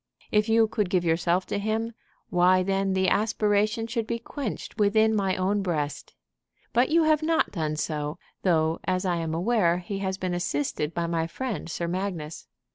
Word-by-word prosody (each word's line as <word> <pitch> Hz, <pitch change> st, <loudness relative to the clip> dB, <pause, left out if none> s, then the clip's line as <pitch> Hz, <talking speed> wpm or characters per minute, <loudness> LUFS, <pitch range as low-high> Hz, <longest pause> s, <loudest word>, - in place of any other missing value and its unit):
If 210 Hz, +1 st, +2 dB
you 225 Hz, 0 st, +5 dB
could 210 Hz, -4 st, -1 dB
give 180 Hz, -1 st, +1 dB
yourself 170 Hz, +2 st, +1 dB
to -, -, -2 dB
him, 220 Hz, +2 st, -1 dB, 0.4 s
why 180 Hz, +1 st, +4 dB
then 195 Hz, 0 st, 0 dB
the 190 Hz, 0 st, +2 dB
aspiration 215 Hz, +1 st, +1 dB
should 230 Hz, -1 st, -3 dB
be 235 Hz, -, -1 dB
quenched 235 Hz, -2 st, -6 dB
within 220 Hz, +1 st, +4 dB
my 195 Hz, -3 st, +1 dB
own 195 Hz, +2 st, +1 dB
breast. 155 Hz, -6 st, -3 dB, 0.6 s
But 245 Hz, +2 st, +3 dB
you 330 Hz, +1 st, +4 dB
have 310 Hz, -1 st, +3 dB
not 320 Hz, +1 st, +1 dB
done 155 Hz, -4 st, -2 dB
so, 150 Hz, -1 st, -3 dB, 0.2 s
though, 160 Hz, -3 st, +2 dB
as 185 Hz, 0 st, 0 dB
I 175 Hz, -2 st, +1 dB
am 165 Hz, -1 st, -2 dB
aware, 175 Hz, -2 st, +2 dB
he 195 Hz, +2 st, -5 dB
has 190 Hz, -1 st, -2 dB
been 185 Hz, -2 st, -2 dB
assisted 150 Hz, -2 st, -2 dB
by 170 Hz, -, 0 dB
my 165 Hz, -1 st, -1 dB
friend 225 Hz, +1 st, -4 dB
Sir 170 Hz, +1 st, -3 dB
Magnus. 175 Hz, -4 st, -4 dB
190 Hz, 180 wpm, -26 LUFS, 170-220 Hz, 0.6 s, you